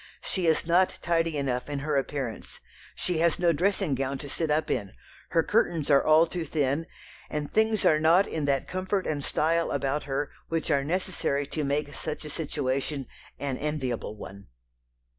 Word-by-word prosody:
She 185 -3 0
is 160 0 +3
not 175 +3 +3
tidy 165 -2 +1
enough 130 -2 -1
in 145 - -2
her 145 +2 -1
appearance; 135 -4 -3 0.4
she 175 -3 -1
has 170 -1 +3
no 170 -1 +3
dressing 190 0 +1
gown 135 +1 -1
to 145 - -7
sit 165 -2 -1
up 150 +1 +1
in; 100 -6 -2 0.4
her 165 - +3
curtains 170 -9 +1
are 140 - +6
all 155 +2 +6
too 170 +1 -4
thin, 145 0 0 0.4
and 150 -1 -4
things 220 -1 +2
are 155 - +5
not 165 +5 +5
in 155 -2 -2
that 140 -2 +1
comfort 185 +1 -1
and 145 -2 -2
style 165 +4 +1
about 140 +1 -1
her 140 +1 -2 0.2
which 165 0 -1
are 140 -2 +3
necessary 160 -3 -1
to 150 +2 -3
make 145 +1 -1
such 155 +2 -5
a 150 - -6
situation 140 -2 -2 0.3
an 135 -2 -3
enviable 130 -8 -2
one." 100 -1 -10
150 Hz, 180 wpm, -27 LUFS, 140-165 Hz, 0.4 s, are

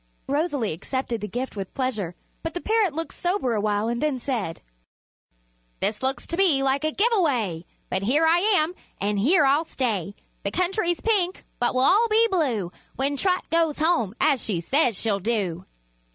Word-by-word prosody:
Rosalie 285 - 0
accepted 235 - -3
the 210 - -3
gift 245 +5 -4
with 195 -2 -6
pleasure, 215 -10 -2 0.3
but 325 +1 -5
the - - -1
parrot 425 -6 +1
looked 325 +1 -4
sober 355 - -1
awhile 210 0 0
and 235 +1 -2
then 300 -3 +1
said: 235 -10 -3 1.2
"This 210 0 -1
looks 260 -1 -1
to 335 - -2
me 330 -9 +3
like 270 +2 +1
a 310 - +1
give 435 +9 +2
away; 235 - 0 0.2
But 190 - -1
here 275 +11 +3
I 330 +2 +5
am, 360 -4 +2 0.3
and 205 +1 0
here 300 - +4
I'll 280 +4 +3
stay. 210 - -2 0.3
The 200 - -2
country's 355 - 0
pink, 385 -5 0
but 245 +1 +1
we'll 255 - +3
all 435 +5 +5
be 450 +2 +4
blue 245 - 0 0.2
When 275 +2 0
Trot 365 +5 0
goes 330 -2 +2
home, 305 - +1
as 265 -6 +2
she 195 -6 -1
says 245 - +1
she'll 210 -3 0
do." 190 -4 -2
270 Hz, 180 wpm, -24 LUFS, 210-335 Hz, 1.2 s, I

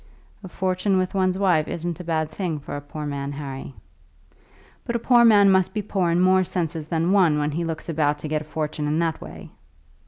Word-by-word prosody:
"A - - -7
fortune 185 +2 0
with 185 0 -1
one's 185 -1 +1
wife 180 -6 +2
isn't 170 0 -4
a - - -6
bad 160 -2 -1
thing 170 -2 -3
for 145 0 -7
a 145 - -5
poor 150 +1 -7
man, 140 -1 -4
Harry." 135 -2 -7 1.1
"But 235 - -4
a 235 - -3
poor 240 -2 +6
man 205 -4 +6
must 190 +2 +2
be 210 - -1
poor 190 -3 0
in 170 +1 +2
more 185 0 +4
senses 165 -4 -3
than 165 +2 0
one 180 -7 +4
when 150 0 0
he 165 +4 -2
looks 165 -1 -5
about 150 -3 0
to 150 - -7
get 155 0 -1
a - - -9
fortune 150 -1 -3
in 150 +1 0
that 165 -1 -1
way." - - -10
165 Hz, 220 wpm, -23 LUFS, 150-185 Hz, 1.1 s, poor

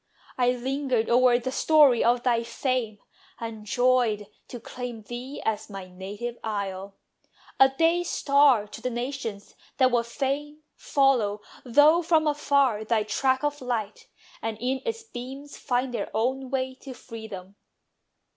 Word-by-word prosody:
I 250 -1 +2
lingered 255 -2 -1
o'er 245 0 +5
the 255 +2 -4
story 285 -3 +5
of 240 +1 +2
thy 235 -2 +2
fame, 235 -2 -2 0.4
And 220 -2 -7
joyed 245 -3 +2 0.2
to 245 - -8
claim 240 -1 -7
thee 245 +5 -7
as 220 -1 -2
my 195 -2 -8
native 205 +6 -7
isle; 200 -2 -4 0.6
A 270 - +8
day 330 +6 +2
star 280 -8 +3
to 210 +2 -11
the 250 - -1
nations, 240 -4 -5 0.2
that 260 -1 +4
would 235 -1 +1
fain 295 +4 -3
Follow, 240 -7 +1 0.2
though 295 +7 +5
from 325 -2 +2
afar, 280 -6 +2
thy 220 0 +1
track 260 +5 0
of 290 -1 -1
light, 225 -5 -4 0.3
And 225 -1 -3
in 260 +2 -1
its 455 -1 -3
beams 270 - -9
find 250 0 -1
their 220 -4 -3
own 260 +3 -1
way 260 -1 -1
to 265 -2 -9
freedom. 220 -6 -9
245 Hz, 145 wpm, -26 LUFS, 220-270 Hz, 0.6 s, A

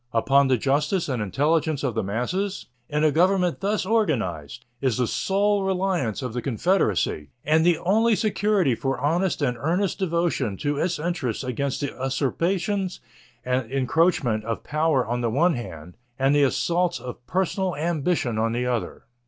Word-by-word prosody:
Upon 135 +4 +4
the 130 -1 +3
justice 150 - 0
and 130 -5 -2
intelligence 145 - 0
of 130 -4 0
the 110 - 0
masses, 125 - -2 0.2
in 150 +1 0
a 155 - +4
government 180 +2 +2
thus 200 0 -1
organized, 125 - -1 0.2
is 130 -4 +1
the 125 - +2
sole 200 - +1
reliance 185 - -1
of 125 -3 -4
the 125 - -2
confederacy 115 - 0 0.2
and 155 +2 +3
the 175 -1 +4
only 220 +6 +2
security 205 - +1
for 135 +3 -2
honest 165 +4 0
and 125 -3 0
earnest 180 - 0
devotion 170 - 0
to 145 +5 -1
its 175 0 0
interests 150 -8 -2
against 135 +3 -2
the 140 - -2
usurpations 175 +9 -1 0.5
and 125 -2 -1
encroachment 135 -4 +1
of 115 0 -4
power 150 -3 +1
on 120 +2 -2
the 120 - 0
one 165 +9 +3
hand 85 - -8 0.2
and 135 +1 +2
the 145 - +4
assaults 170 +5 +1
of 125 -1 -8
personal 190 0 -1
ambition 155 -6 -1
on 115 +1 +1
the 125 +1 -1
other. 125 -3 -3
145 Hz, 160 wpm, -24 LUFS, 125-180 Hz, 0.5 s, Upon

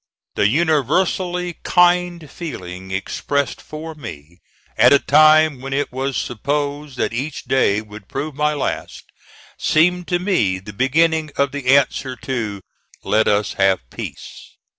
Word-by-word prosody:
The 100 - +2
universally 175 - 0
kind 175 -2 +2
feeling 95 - -8
expressed 140 +9 -2
for 160 +1 -8
me 85 - -10 0.4
at - - +6
a 140 - +8
time 155 -1 +5
when 135 +1 -5
it 145 +1 -1
was 135 +1 -2
supposed 145 +3 -3
that - - -1
each 140 +5 -4
day 105 -6 +2
would 105 -1 -12
prove 145 +3 -4
my 150 +2 0
last, 145 - -4 0.6
seemed 180 +3 +2
to 175 - +1
me 175 - +1
the 100 +3 -10
beginning 155 +7 +2
of 140 -1 +2
the 140 -1 +3
answer 130 -1 -1
to 115 -7 -4 0.4
"Let 110 +1 +2
us 105 -1 +1
have 95 -10 +2
peace." - - -9
140 Hz, 140 wpm, -20 LUFS, 110-155 Hz, 0.6 s, a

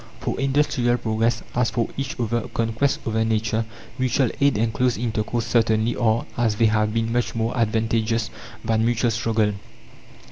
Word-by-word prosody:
For - - -3
industrial 135 -3 +2
progress, 115 0 0
as 125 -1 +2
for 115 - -1
each 135 -2 -4
other 120 -1 -1
conquest 115 +5 0
over 110 0 +1
nature, 110 0 0 0.3
mutual 130 -1 +2
aid 140 -5 +4
and 110 +1 0
close 125 -1 +1
intercourse 115 0 -1
certainly 115 0 +2
are, 115 -1 +1
as 115 -3 +1
they 115 - +3
have 110 -1 +2
been, 115 +1 -1
much 120 -1 0
more 115 +2 -1
advantageous 115 0 0 0.3
than 110 0 +2
mutual 115 0 +2
struggle. 110 -2 +1
115 Hz, 155 wpm, -23 LUFS, 110-120 Hz, 0.3 s, aid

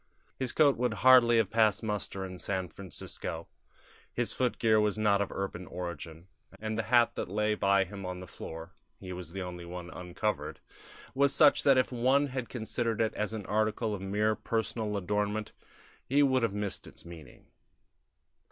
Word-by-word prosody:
His 130 -2 0
coat 145 -3 +4
would 120 -2 0
hardly 125 -2 +8
have 110 -3 +2
passed 110 -1 +3
muster 105 -3 -3
in 90 -1 -8
San 95 -2 -2
Francisco: 85 -3 -6 0.6
his 120 -1 -1
footgear 115 -3 +2
was 105 0 +1
not 105 -2 +3
of 100 - -2
urban 95 -2 -4
origin, 85 -1 -7 0.3
and 110 0 -3
the 115 - 0
hat 120 -1 +5
that - - -4
lay 105 +2 +1
by 100 -2 +3
him 100 +1 -8
on 90 0 -5
the 90 - -8
floor 80 0 -9 0.3
(he 95 -1 -7
was 90 -2 -7
the 95 +1 -4
only 90 -1 -7
one 85 0 -7
uncovered) 90 +5 -3 0.5
was 140 +1 +3
such 150 -2 +6
that 135 -2 +5
if 130 - +2
one 130 +4 +3
had 130 -2 -4
considered 115 -1 -2
it 110 -1 +1
as 105 -1 -2
an 105 -3 -5
article 110 +1 0
of 100 - -5
mere 105 +3 +1
personal 110 -2 -2
adornment 105 +2 -1 0.6
he 145 +3 +4
would 130 -2 +3
have 115 -3 +1
missed 105 -1 -2
its - - -13
meaning. 80 -6 -12
105 Hz, 175 wpm, -30 LUFS, 90-115 Hz, 0.6 s, hardly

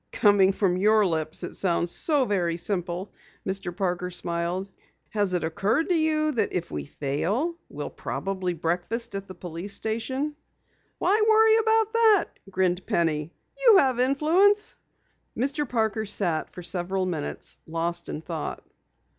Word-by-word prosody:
"Coming 205 -4 +5
from 190 -2 +1
your 215 +2 +4
lips 160 -1 -1
it 175 - -5
sounds 175 -2 +1
so 290 - +2
very 175 -6 0
simple," 180 +1 -3 0.3
Mr. 190 -1 -2
Parker 180 -2 -1
smiled. 175 +1 -2 0.4
"Has 205 -3 +1
it 180 - 0
occurred 200 - 0
to 360 - +3
you 310 -1 +2
that 245 - -1
if 180 - -3
we 75 -1 -4
fail, 190 - -1
we'll - - -6
probably 185 -2 -3
breakfast 175 +8 -2
at 195 0 -5
the 185 - -9
police 175 +3 -6
station?" 260 +8 -2 0.6
"Why 420 +3 +2
worry 440 0 +6
about 445 0 +2
that?" 445 -4 +5 0.2
grinned 185 -1 0
Penny. 160 -2 0 0.3
"You 460 -5 +8
have 260 -7 +3
influence." 330 +11 +3 0.6
Mr. 275 +2 0
Parker 220 -2 0
sat 175 -6 0
for 180 - -10
several 185 +1 0
minutes 160 -5 -4
lost 170 +1 -3
in 150 - -4
thought. 160 -2 -5
195 Hz, 145 wpm, -26 LUFS, 175-270 Hz, 0.6 s, You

